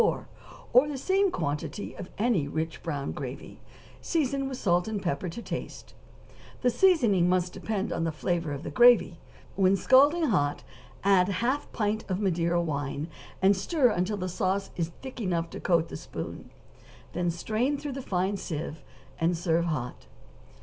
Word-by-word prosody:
44, -, -, 0 dB, 0.5 s
or 250 Hz, +5 st, +7 dB
the 290 Hz, -2 st, -4 dB
same 385 Hz, +7 st, +2 dB
quantity 150 Hz, -, -3 dB
of 185 Hz, -, -8 dB
any 210 Hz, -10 st, +1 dB
rich 160 Hz, +2 st, -3 dB
brown 145 Hz, -4 st, -3 dB
gravy, 135 Hz, -2 st, -7 dB, 0.4 s
season 275 Hz, -4 st, 0 dB
with 260 Hz, -, -5 dB
salt 175 Hz, -3 st, +2 dB
and 220 Hz, -2 st, -2 dB
pepper 175 Hz, -1 st, -2 dB
to 230 Hz, +8 st, -7 dB
taste; -, -, -6 dB, 0.7 s
the 250 Hz, -, +4 dB
seasoning 230 Hz, -, +4 dB
must 180 Hz, -1 st, +1 dB
depend 210 Hz, -2 st, -2 dB
on 165 Hz, -, -1 dB
the 165 Hz, -, 0 dB
flavor 165 Hz, 0 st, -1 dB
of 145 Hz, +1 st, -5 dB
the -, -, -5 dB
gravy; 235 Hz, -9 st, +5 dB, 0.4 s
when 190 Hz, 0 st, +4 dB
scalding 280 Hz, -, +5 dB
hot 145 Hz, -, +1 dB, 0.4 s
add 190 Hz, -2 st, +5 dB
half 245 Hz, +8 st, 0 dB
a -, -, -22 dB
pint 215 Hz, 0 st, -1 dB
of 185 Hz, 0 st, -1 dB
Madeira 175 Hz, -3 st, +1 dB
wine, 145 Hz, -1 st, -2 dB, 0.3 s
and 195 Hz, +1 st, +6 dB
stir 250 Hz, -, +2 dB
till 205 Hz, +3 st, -1 dB
the 185 Hz, -1 st, -3 dB
sauce 190 Hz, +1 st, -1 dB
is 170 Hz, -2 st, -1 dB, 0.2 s
thick 260 Hz, -2 st, -7 dB
enough 170 Hz, -4 st, -1 dB
to -, -, -6 dB
coat 170 Hz, -3 st, +2 dB
the -, -, -7 dB
spoon; -, -, -7 dB, 0.6 s
then 175 Hz, 0 st, 0 dB
strain 220 Hz, -, 0 dB
through 290 Hz, -1 st, -5 dB
a 270 Hz, -, -4 dB
fine 190 Hz, -2 st, 0 dB
sieve, 160 Hz, -3 st, -5 dB, 0.4 s
and 170 Hz, +1 st, +2 dB
serve 170 Hz, 0 st, +1 dB
hot. 125 Hz, -, -4 dB
185 Hz, 170 wpm, -28 LUFS, 165-240 Hz, 0.7 s, or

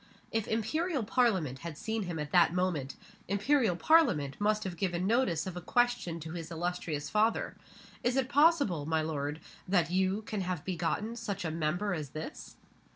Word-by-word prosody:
If 225 Hz, -1 st, -1 dB
Imperial 275 Hz, -, 0 dB
Parliament 195 Hz, -, +1 dB
had 165 Hz, -1 st, -7 dB
seen 220 Hz, 0 st, -2 dB
him 175 Hz, -2 st, -4 dB
at 150 Hz, -1 st, -4 dB
that 175 Hz, -1 st, +5 dB
moment, 170 Hz, -7 st, -1 dB, 0.3 s
Imperial 205 Hz, +1 st, +2 dB
Parliament 175 Hz, -, +3 dB
must 215 Hz, +1 st, +2 dB
have 185 Hz, -2 st, -4 dB
given 175 Hz, 0 st, -1 dB
notice 205 Hz, -7 st, +2 dB
of 185 Hz, -2 st, -5 dB
a 180 Hz, -, -5 dB
question 240 Hz, -5 st, +1 dB
to 160 Hz, +1 st, -6 dB
his 165 Hz, -1 st, -6 dB
illustrious 165 Hz, -3 st, -3 dB
father: 220 Hz, +2 st, +1 dB, 0.5 s
Is 245 Hz, +1 st, +1 dB
it 265 Hz, -1 st, +2 dB
possible, 285 Hz, -, +3 dB
my 160 Hz, -1 st, +1 dB
lord, 150 Hz, -1 st, -3 dB, 0.3 s
that 175 Hz, -3 st, +2 dB
you 190 Hz, +3 st, +1 dB
can 210 Hz, -2 st, -3 dB
have 180 Hz, -4 st, -3 dB
begotten 190 Hz, +5 st, -2 dB
such 200 Hz, -5 st, -4 dB
a 160 Hz, -, -1 dB
Member 165 Hz, +5 st, -1 dB
as 150 Hz, -5 st, -4 dB
this? 215 Hz, -, -7 dB
185 Hz, 170 wpm, -31 LUFS, 160-220 Hz, 0.5 s, that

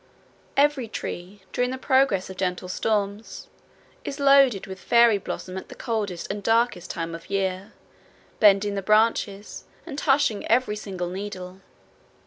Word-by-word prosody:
Every 280 Hz, -4 st, +3 dB
tree 190 Hz, -2 st, -7 dB
during 245 Hz, 0 st, +1 dB
the 260 Hz, -, -4 dB
progress 260 Hz, -8 st, +2 dB
of 190 Hz, -, -11 dB
gentle 180 Hz, -1 st, -2 dB
storms 205 Hz, +1 st, -2 dB, 0.5 s
is 275 Hz, -, -6 dB
loaded 275 Hz, -8 st, +5 dB
with, 190 Hz, -2 st, -8 dB
fairy 235 Hz, 0 st, +4 dB
bloom 185 Hz, 0 st, -6 dB
at -, -, -14 dB
the -, -, -10 dB
coldest 210 Hz, -7 st, -3 dB
and 205 Hz, +1 st, -5 dB
darkest 225 Hz, -4 st, +1 dB
time 165 Hz, 0 st, -4 dB
of 165 Hz, 0 st, -9 dB
year, 190 Hz, -1 st, -2 dB, 0.7 s
bending 205 Hz, -1 st, +5 dB
the 200 Hz, -, -2 dB
branches, 215 Hz, 0 st, +1 dB, 0.2 s
and 300 Hz, -4 st, -6 dB
hushing 270 Hz, -8 st, +2 dB
every 235 Hz, -2 st, +2 dB
singing 185 Hz, -4 st, -5 dB
needle. 190 Hz, -1 st, -7 dB
205 Hz, 140 wpm, -25 LUFS, 190-235 Hz, 0.7 s, loaded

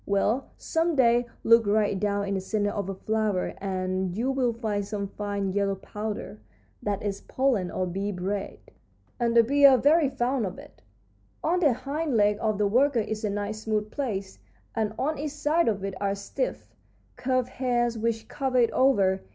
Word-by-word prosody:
Well, 210 Hz, +6 st, +1 dB
some 330 Hz, 0 st, 0 dB
day 240 Hz, -2 st, +4 dB, 0.2 s
look 230 Hz, -1 st, +5 dB
right 205 Hz, -1 st, +2 dB
down 200 Hz, 0 st, 0 dB
in 200 Hz, -, -1 dB
the 190 Hz, -, -1 dB
centre 205 Hz, +1 st, -1 dB
of 200 Hz, -2 st, -3 dB
a 195 Hz, -, -3 dB
flower 215 Hz, -2 st, -1 dB
and 185 Hz, -1 st, -2 dB
you 250 Hz, +4 st, 0 dB
will 260 Hz, -3 st, +1 dB
find 220 Hz, -3 st, -2 dB
some 200 Hz, 0 st, -3 dB
fine 200 Hz, -2 st, -3 dB
yellow 200 Hz, 0 st, +1 dB
powder. 210 Hz, -, -6 dB, 0.4 s
That 205 Hz, -1 st, -2 dB
is 200 Hz, -1 st, -3 dB
pollen, 250 Hz, -9 st, 0 dB
or 185 Hz, -, -2 dB
bee 195 Hz, +3 st, -3 dB
bread, 195 Hz, +2 st, -3 dB, 0.6 s
and 235 Hz, -1 st, +2 dB
the 230 Hz, -, +8 dB
bees 280 Hz, +4 st, +6 dB
are 265 Hz, -2 st, +7 dB
very 290 Hz, +3 st, +4 dB
fond 245 Hz, -3 st, 0 dB
of 185 Hz, -, -7 dB
it. -, -, -14 dB, 0.6 s
On 355 Hz, +3 st, +2 dB
the 300 Hz, -7 st, +4 dB
hind 280 Hz, +2 st, -2 dB
leg 205 Hz, 0 st, +3 dB
of 215 Hz, -2 st, 0 dB
the 210 Hz, -, +2 dB
worker 250 Hz, +4 st, +3 dB
is 220 Hz, 0 st, -4 dB
a 210 Hz, -, 0 dB
nice 205 Hz, +1 st, -3 dB
smooth 215 Hz, -1 st, -1 dB
place, 200 Hz, -9 st, -4 dB, 0.3 s
and 220 Hz, -2 st, -1 dB
on 295 Hz, +2 st, -1 dB
each 300 Hz, +1 st, -2 dB
side 305 Hz, +3 st, +1 dB
of 205 Hz, -3 st, 0 dB
it 195 Hz, -, -3 dB
are 200 Hz, 0 st, 0 dB
stiff, 200 Hz, -, -4 dB, 0.4 s
curved 255 Hz, -1 st, 0 dB
hairs 240 Hz, -2 st, 0 dB
which 225 Hz, 0 st, -2 dB
cover 265 Hz, -3 st, -1 dB
it 235 Hz, -2 st, +4 dB
over. 200 Hz, -8 st, +3 dB
215 Hz, 185 wpm, -27 LUFS, 200-255 Hz, 0.6 s, the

